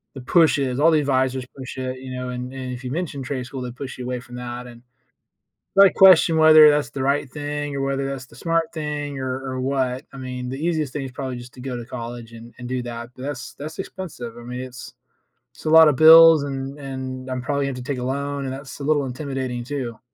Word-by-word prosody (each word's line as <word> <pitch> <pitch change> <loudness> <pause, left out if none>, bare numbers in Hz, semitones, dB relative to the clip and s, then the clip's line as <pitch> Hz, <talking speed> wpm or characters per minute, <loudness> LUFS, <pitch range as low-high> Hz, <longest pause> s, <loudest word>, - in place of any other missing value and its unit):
the 135 - -7
push 160 +3 +4
is, 130 -1 -1
all 160 +3 +5
the 155 - +4
advisors 130 -2 0
push 130 0 -8
it, 130 0 -4
you 130 0 -8
know, 125 0 -4
and 125 +1 -5
and 130 -1 -5
if 125 +1 -8
you 125 - -5
mention 150 -3 -3
trade 130 -1 -4
school, 130 +1 -7
they 125 -1 -5
push 130 +2 -8
you 125 - -6
away 125 0 -3
from 120 0 -12
that, 125 0 -6
and 120 -1 -13 1.0
I 200 - +9
question 185 -4 +6
whether 155 -1 +8
that's 145 0 +1
the 135 - -4
right 140 +2 +1
thing 145 +1 -4
or 140 - -2
whether 135 0 -1
that's 135 -2 -6
the 115 - -18
smart 165 +3 0
thing 150 -3 -4
or 130 0 -3
or 130 -1 -4
what, 130 -1 -1
I - - -9
mean, 125 -1 -5
the 135 +4 -5
easiest 155 -5 -1
thing 145 - -3
is 130 - -7
probably 130 -1 -5
just 120 0 -11
to 125 - -11
go 130 -1 -4
to 120 -1 -6
college 120 -1 -7
and 115 +1 -12
and 125 - -7
do 130 -1 -2
that, 120 0 -7
but 130 - -10
that's 140 -2 -5
that's 155 +5 -8
expensive, 145 -12 -7
I - - -9
mean, 125 +1 -6
it's 130 0 -9 0.6
it's - - -16
a - - +1
lot 160 0 +8
of 150 - +3
bills 160 +1 +9
and 135 0 -5
and 130 -1 -6
I'm 130 0 -2
probably 140 +2 -1
gonna - - -1
have 125 - -6
to 140 - -4
take 135 - -2
a - - -4
loan 140 +2 -2
and 130 - -3
that's 135 +1 -9
a - - -6
little 145 -1 +2
intimidating 130 -2 -4
too. 125 -3 -5
130 Hz, 250 wpm, -22 LUFS, 125-145 Hz, 1.0 s, I